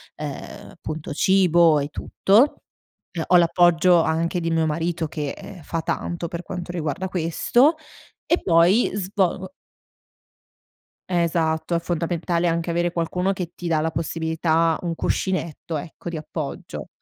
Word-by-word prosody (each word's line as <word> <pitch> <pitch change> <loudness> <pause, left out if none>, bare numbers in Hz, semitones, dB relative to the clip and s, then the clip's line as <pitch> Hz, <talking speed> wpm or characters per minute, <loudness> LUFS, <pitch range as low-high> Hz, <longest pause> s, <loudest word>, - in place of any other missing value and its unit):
ehm, - - -7
appunto, 155 0 -7
cibo 170 -2 +4
e 140 - -2
tutto. 215 - +2 0.5
Ehm, 170 -2 -3
ho 180 - +4
l'appoggio 175 0 +4
anche 165 +3 0
di 165 -1 -2
mio 165 -1 +2
marito 165 +1 -1
che, 150 -2 -4
ehm, 185 -4 -10
fa 165 +2 -3
tanto 170 +1 -3
per 170 +1 -5
quanto 175 -2 -6
riguarda 165 +1 -3
questo. 195 - +2 0.5
E 340 - +2
poi, 175 +6 +4
svo 190 -1 -1 1.6
Esatto. 170 -2 0
È 170 - +2
fondamentale 170 0 -1
anche 165 +1 -1
avere 175 +1 0
qualcuno 180 +3 -1
che 180 -3 -5
ti 175 - -5
dà 160 -2 +2
la 160 +1 -1
possibilità 160 0 0
un 170 -2 -2
cuscinetto 165 -3 -2
ecco, 165 +3 -7
di 170 - -4
appoggio. 155 -1 -6
170 Hz, 140 wpm, -23 LUFS, 160-180 Hz, 1.6 s, cibo